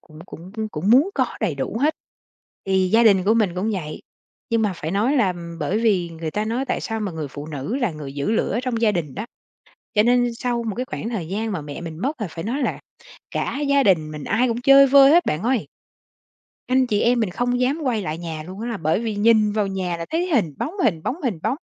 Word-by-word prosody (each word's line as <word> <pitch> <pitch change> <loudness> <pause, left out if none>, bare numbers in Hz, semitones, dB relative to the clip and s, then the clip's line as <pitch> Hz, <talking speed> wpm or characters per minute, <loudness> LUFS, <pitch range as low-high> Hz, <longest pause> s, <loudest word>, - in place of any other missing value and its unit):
cũng 155 -2 -16
cũng 180 +2 -11 0.2
cũng 180 +6 -1
muốn 280 +10 +5
có 260 -2 +2
đầy 195 -9 0
đủ 140 +10 -3
hết, 305 +3 +2 0.7
thì 190 -1 +2
gia 230 +1 +5
đình 200 -5 +5
của 215 +3 +4
mình 210 -6 +1
cũng 190 +5 -1
vậy. 155 -6 -5 0.5
Nhưng 230 -1 +2
mà 210 -3 +1
phải 160 -1 -4
nói 220 +10 +1
là, 240 -6 +4
ừm, 170 -1 -9
bởi 170 +7 -1
vì 195 -7 +1
người 160 -1 -5
ta 210 +6 -2
nói 235 +5 -1
tại 255 - -2
sao 225 -1 -3
mà 205 -4 -3
người 155 -3 -5
phụ 145 +2 -8
nữ 150 - -4
là 245 -7 0
người 150 -3 -8
giữ 145 +7 -2
lửa 225 0 0
trong 240 -3 -2
gia 215 -2 +4
đình 155 -8 -3
đó. 215 - -5 0.7
Cho 210 - +5
nên 245 0 +3
sau 240 0 -2
một 220 -4 -3
cái 250 - -3
khoảng 230 - -5
thời 200 -9 -4
gian 215 +5 -2
mà 180 -6 -3
mẹ 145 +2 -7
mình 165 -2 -7
mất, 275 +1 -2
là 210 - -1
phải 165 0 -7
nói 250 +7 -2
là - - -2 0.5
cả 275 - -2
gia 280 -1 +4
đình 160 -8 +2
mình 150 -1 -7
ai 235 - +1
cũng 235 0 -2
chơi 275 +2 +7
vơi 275 +1 +7
hết, 345 +2 +5
bạn 155 +5 -1
ơi. 245 -1 0 1.0
Anh 260 0 +3
chị 210 -4 0
em 240 0 +3
mình 215 -5 0
không 245 +5 -1
dám 265 +5 +1
quay 235 -5 0
lại 155 -2 -4
nhà 165 -2 -5
luôn 185 +5 -9
á, 235 - -4
là 230 - -2
bởi 160 +1 0
vì 225 -2 -2
nhìn 215 0 +4
vào 210 -1 0
nhà 185 -3 -2
là 165 0 -6
thấy 340 +3 0
hình 175 - +1
bóng, 320 - -3
hình 165 -8 +1
bóng, 295 - -3
hình 230 - -1
bóng, 230 +5 0
215 Hz, 255 wpm, -22 LUFS, 170-245 Hz, 1.0 s, chơi